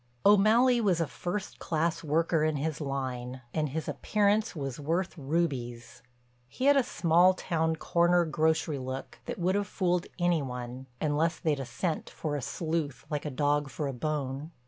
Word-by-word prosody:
O'Malley 225 +5 +5
was 190 -6 +2
a 165 - +2
first 180 +6 -5
class 165 +1 -1
worker 160 +1 +2
in 155 -1 +1
his 155 +2 -2
line, 130 -2 -3
and 155 -2 0
his 155 +3 -4
appearance 210 0 +1
was 135 -4 -4
worth 170 +6 -1
rubies. 135 -6 -2 0.5
He'd 265 - +3
a 275 - +5
small 175 -4 +4
town, 160 -2 0
corner 175 +2 +3
grocery 155 -1 +1
look 130 +1 -6
that - - -4
would 180 +1 +1
have 200 0 0
fooled 180 -2 0
any 175 -3 +2
one 125 0 -6
unless 155 +2 +1
they'd 155 -5 0
a 135 - -3
scent 160 +7 -3
for 150 -2 -3
a 145 - -2
sleuth 155 -1 -3
like 150 0 -2
a - - -1
dog 145 +1 +1
for 150 - -4
a 135 - -2
bone. 140 +1 -3
160 Hz, 170 wpm, -29 LUFS, 140-175 Hz, 0.5 s, O'Malley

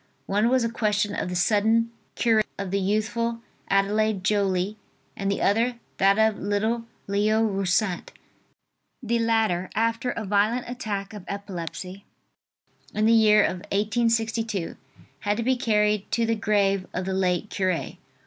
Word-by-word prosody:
One 210 +4 +2
was 255 -1 +3
a 230 - -1
question 210 -2 0
of 180 - -2
the 180 - -4
sudden 220 +5 +2 0.2
cure 225 -2 +3 0.2
of 195 -2 -4
the 200 - +1
youthful 225 +4 -1 0.3
Adelaide 200 0 +1
Joly, 200 0 0 0.4
and 195 -1 -2
the 200 - -1
other, 230 +4 +2 0.2
that 195 +1 +4
of 220 -1 +2
little 220 +4 -1 0.2
Leo 210 +2 +2
Roussat. 195 -2 0 0.9
The 235 0 0
latter, 220 -6 +1
after 230 +3 0
a 230 -3 -3
violent 210 +5 +1
attack 210 -5 -4
of 205 -3 -8
epilepsy, 195 -1 -6 0.9
in 215 +1 +2
the 225 - +5
year 215 -2 +6
1862, 220 0 -1 0.4
had 205 +5 -1
to 230 - -1
be 260 +2 +2
carried 210 -4 +1
to 230 - +2
the 225 - +1
grave 200 -3 +1
of 185 - -2
the 190 - -2
late 185 +1 0
cure. 185 -3 -1
210 Hz, 145 wpm, -25 LUFS, 195-225 Hz, 0.9 s, year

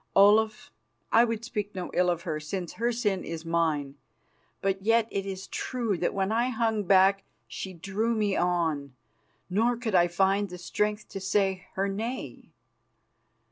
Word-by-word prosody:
Olaf, 215 +2 +4 0.4
I 230 - +6
would 230 -1 -2
speak 210 -4 -4
no 180 -1 -4
ill 180 0 +3
of 170 -1 -1
her, 160 -4 -2
since 175 +3 -5
her 235 +1 0
sin 210 -5 -1
is 165 0 -6
mine, 160 -4 0 0.7
but 195 0 -1
yet 225 +2 +3
it 195 0 -2
is 190 -1 -5
true 235 -6 -2
that 175 - +1
when 195 +1 0
I 235 +3 +2
hung 225 -3 0
back 195 +1 +5 0.2
she 190 - -6
drew 200 +7 -1
me 210 -3 +1
on, 160 -6 0 0.5
nor 230 +6 +1
could 230 -3 -3
I 175 -1 +5
find 195 +3 +1
the 180 - -7
strength 210 +4 -2
to 195 - -6
say 190 -1 0
her 195 +1 0
nay. 225 +6 -5
195 Hz, 165 wpm, -28 LUFS, 180-220 Hz, 0.7 s, I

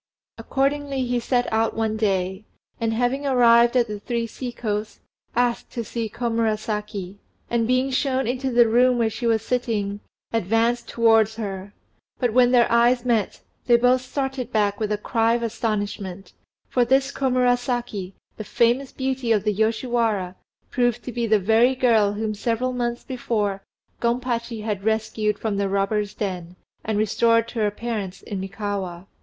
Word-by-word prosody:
Accordingly 275 -1 -1
he 245 0 0
set 245 +1 +1
out 225 0 +1
one 220 -1 0
day, 190 -2 -1 0.4
and 225 -1 0
having 250 +5 0
arrived 235 -1 +5
at 240 - +4
"The 210 -2 -6
Three 235 +2 -2
Sea 245 +2 -6
coasts," 215 -2 -4 0.4
asked 240 0 0
to 235 - -3
see 225 0 -4
Komurasaki; 215 -4 -2 0.3
and 230 -1 +1
being 255 +2 +1
shown 265 0 0
into 255 +2 -1
the 240 -1 +5
room 245 +2 +4
where 225 -2 +1
she 235 - -3
was 225 -1 +2
sitting, 215 -5 -1 0.3
advanced 225 +3 +1
towards 225 -2 +3
her; 200 -2 -6 0.4
but 245 -4 0
when 245 0 +5
their 245 -2 +5
eyes 240 +1 +3
met, 230 -5 0 0.3
they 240 -1 +6
both 250 +1 +3
started 265 -1 -4
back 205 -2 +1
with 215 -1 -1
a 210 - +1
cry 225 +2 +1
of 235 - -2
astonishment, 205 -4 -3 0.3
for 250 - +2
this 265 +3 +2
Komurasaki, 245 -6 0 0.2
the 215 - -5
famous 240 +5 +1
beauty 265 -3 -2
of 210 -3 +3
the 210 -1 +1
Yoshiwara, 220 -3 0 0.4
proved 245 -2 +1
to 250 - -5
be 235 0 -2
the 215 0 +4
very 225 +6 +3
girl 225 -5 +3
whom 215 +1 -2
several 235 +4 -1
months 240 -1 -2
before 210 -6 -2 0.4
Gompachi 235 -1 -1
had 210 -3 -3
rescued 220 -1 0
from 215 -3 -2
the 200 -1 0
robbers' 200 +1 -1
den, 180 -4 -4 0.3
and 220 -1 -1
restored 230 +2 +2
to 230 - -5
her 210 -1 +2
parents 210 -3 -5
in 200 - -5
Mikawa. 195 -2 -4
230 Hz, 160 wpm, -23 LUFS, 210-245 Hz, 0.4 s, they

